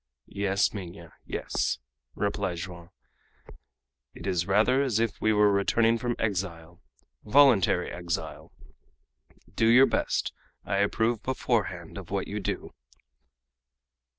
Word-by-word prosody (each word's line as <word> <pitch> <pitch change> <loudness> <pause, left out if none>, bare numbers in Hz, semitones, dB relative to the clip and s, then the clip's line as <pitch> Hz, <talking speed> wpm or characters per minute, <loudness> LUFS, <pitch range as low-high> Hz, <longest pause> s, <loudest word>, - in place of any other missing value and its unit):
"Yes, 100 0 0
Minha; 90 -4 -9
yes," - - -2 0.4
replied 100 -3 -2
Joam. 85 -1 -8 1.3
"It 85 - -10
is 90 -2 0
rather 110 +7 +3
as 125 -6 0
if 115 -2 -1
we 110 - +3
were 105 -1 +4
returning 115 +4 +2
from 120 0 -2
exile 90 -5 -3 0.4
voluntary 110 -7 +4
exile! 85 -1 -5 1.0
Do 115 - +2
your 125 +4 +7
best; - - -1 0.3
I 100 +2 -1
approve 110 +3 +1
beforehand 130 0 -2
of - - -11
what - - -2
you - - -4
do." - - -4
100 Hz, 115 wpm, -27 LUFS, 90-115 Hz, 1.3 s, your